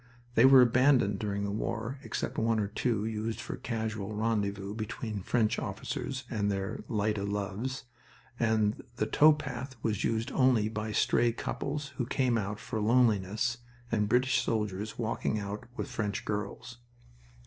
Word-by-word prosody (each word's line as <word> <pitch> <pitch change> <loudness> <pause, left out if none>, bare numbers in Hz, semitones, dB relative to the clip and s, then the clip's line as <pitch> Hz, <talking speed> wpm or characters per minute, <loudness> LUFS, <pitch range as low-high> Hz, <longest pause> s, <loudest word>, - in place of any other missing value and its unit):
They 120 +1 +6
were 130 -1 +9
abandoned 125 -4 +4
during 100 -1 -2
the 100 - -1
war, 115 +5 -3
except - - -3
one 115 0 +2
or 105 - +1
two 110 -1 0
used 110 0 -3
for - - -5
casual 110 -3 -3
rendezvous 100 -2 -1
between 110 -1 -4
French 110 +3 +1
officers 130 -1 -4
and 105 -4 -1
their 95 0 -3
light 105 -1 0
o' - - -2
loves, 105 +6 -3 0.6
and 110 -2 +1
the 110 - 0
tow 150 +8 +6
path 135 -3 -4
was 105 -3 0
used 115 +3 0
only 125 -5 +3
by 110 0 -3
stray 120 +2 +3
couples 140 +4 -4
who 125 - -1
came 125 -2 +1
out 105 -1 -2
for 115 -4 -4
loneliness, 110 0 +2 0.3
and 105 -2 +1
British 125 0 +3
soldiers 105 -3 -2
walking 110 -1 -1
out 105 +1 -5
with - - -3
French 105 -3 -3
girls. 105 +3 -4
110 Hz, 155 wpm, -30 LUFS, 105-120 Hz, 0.6 s, were